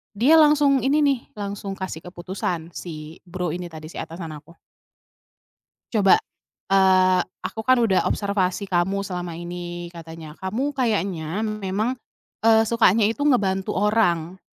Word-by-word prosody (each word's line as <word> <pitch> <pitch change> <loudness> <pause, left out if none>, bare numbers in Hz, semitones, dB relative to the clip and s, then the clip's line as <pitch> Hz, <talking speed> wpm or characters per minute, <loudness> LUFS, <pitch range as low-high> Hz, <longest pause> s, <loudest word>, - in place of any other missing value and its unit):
dia 280 +10 +5
langsung 295 -3 +5
ini 295 +2 +3
nih, 275 -3 +2 0.2
langsung 200 -1 -5
kasih 185 -4 -5
keputusan 175 -2 -4
si 160 -2 -8
bro 175 -1 -3
ini 175 +2 -5
tadi 155 -2 -10
si - - -10
atasan 165 -1 -6
aku. 165 +3 -20 1.4
"Coba, 205 -4 +5 0.6
eee, 185 -1 +5 0.2
aku 220 - -4
kan 255 0 +6
udah 195 -4 +2
observasi 200 -1 -1
kamu 190 +3 +1
selama 180 -3 -5
ini," 175 0 -6
katanya, 165 -2 -10
"kamu 240 +10 -2
kayaknya 200 - -1
memang, 215 +3 -2 0.5
eee, 225 0 +6
sukanya 225 -2 +3
itu 225 +7 0
ngebantu 195 -8 +1
orang 190 -4 +1
190 Hz, 130 wpm, -23 LUFS, 175-220 Hz, 1.4 s, kan